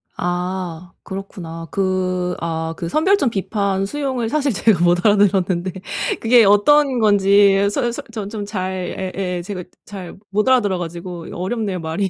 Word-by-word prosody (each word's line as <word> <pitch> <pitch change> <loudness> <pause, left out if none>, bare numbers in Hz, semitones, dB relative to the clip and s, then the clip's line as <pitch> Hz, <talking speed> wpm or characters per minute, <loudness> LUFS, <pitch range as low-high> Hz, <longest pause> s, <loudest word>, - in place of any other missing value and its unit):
아. 180 -1 -3
그렇구나. 170 -4 -7
그 185 -2 -1
아 160 -1 -2
그 170 -2 -4
선별적 340 - +3
비판 195 -1 -1
수용을 260 0 -2
사실 290 -2 +1
제가 195 -4 +3
못 175 +3 +2
알아 210 -1 +6
들었는데 185 -2 +2 0.5
그게 230 0 +5
어떤 255 +6 +4
건지 200 -1 +5
서 240 +3 0
서 235 - -5
전 210 -3 -5
좀 210 -2 -5
잘 185 -1 -4
예예. 180 -2 -2
제가 185 -1 -5 0.2
잘 190 -4 -9
못 210 +3 0
알아들어 210 -8 +3
가지고. 175 0 -6
이 - - -9
어렵네요 190 0 -2
말이. 165 +4 -2
195 Hz, 290 characters per minute, -20 LUFS, 180-210 Hz, 0.5 s, 알아